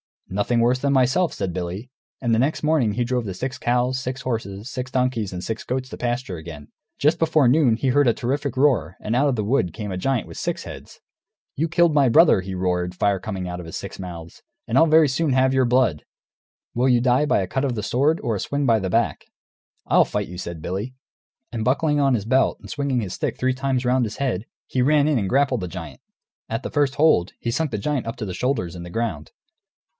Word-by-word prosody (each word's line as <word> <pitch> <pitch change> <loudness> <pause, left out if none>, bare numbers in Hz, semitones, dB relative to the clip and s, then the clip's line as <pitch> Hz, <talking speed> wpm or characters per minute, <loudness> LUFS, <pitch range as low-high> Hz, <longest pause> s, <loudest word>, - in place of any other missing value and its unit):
"Nothing 105 +5 +1
worse 125 +2 +2
than 140 +1 +1
myself," 135 +7 +2
said 90 - -3
Billy. 90 +7 -5 0.3
And 120 -3 0
next 130 +9 +1
morning 150 -9 +2
he 120 - 0
drove 125 -1 -1
the 95 - -4
six 130 +8 -4
cows, 125 +1 +1
six 130 0 -4
horses, 110 -4 -4
six 130 -1 -5
donkeys, 125 -7 -1
and 90 0 -5
six 110 0 -4
goats 130 +1 -3
to - - -8
pasture 120 -6 -2
again. 80 -2 -10 0.3
Just 150 +3 +2
before 155 -4 +3
noon 130 -4 +4
he 130 +3 -1
heard 145 +1 +3
a 120 - +4
terrific 140 +3 -2
roar; 120 - +2
and 110 +2 -2
out 140 +4 +3
of 135 - +1
the 110 - -1
wood 100 - +1
came 105 +1 -5
a 90 - -3
giant 130 +5 -1
with - - -10
six - - -3
heads. - - -11 0.5
"You 160 +4 0
killed 170 -1 +3
my 145 -2 +4
brother," 120 - +5
he 95 0 -6
roared, 90 -1 -1
fire 100 +1 +1
coming 95 -2 -5
out 90 0 -5
of 90 - -8
his 80 - -8
six - - -7
mouths, 85 -3 -8 0.3
"and 115 - -2
I'll 165 - +6
very 155 -1 +5
soon 140 +2 0
have 130 0 +3
your 130 -1 +3
blood! 120 - +2 0.7
Will 125 +2 +2
you 120 -1 +4
die 125 +3 +3
by 145 - +2
a 95 - -3
cut 135 +8 -1
of 130 -3 -1
the 105 - -3
sword, 140 +9 +1
or 115 - 0
a - - -3
swing 140 +6 -1
by 115 -3 +4
the 95 -2 -3
back?" 115 +4 0 0.6
"I'll - - +4
fight - - -3
you," 90 - -8
said 85 -3 -6
Billy. 105 +8 -4 0.6
And 115 -2 -3
buckling 150 +3 +2
on 135 -2 +3
his 105 -3 -3
belt 130 +3 +2
and - - -12
swinging 140 -4 -1
his 95 -4 -5
stick - - -3
three 130 0 +1
times 130 -1 -1
round 125 0 +2
his 110 - -6
head, 120 -7 -1 0.2
he 130 - -1
ran 145 +2 +4
in 145 -5 +2
and 95 -3 -2
grappled 135 -2 +2
the 90 - -3
giant. 85 -6 -8 0.5
At 115 +4 -3
the - - -5
first 145 -2 +1
hold, 145 - +3
he 120 - -2
sunk 160 +5 0
the - - -2
giant 130 +3 -2
up 115 - -3
to 110 - -5
the 95 - -5
shoulders 90 -8 -1
in 85 - -7
the 85 - -8
ground. 90 -8 -3
125 Hz, 240 wpm, -23 LUFS, 100-135 Hz, 0.7 s, I'll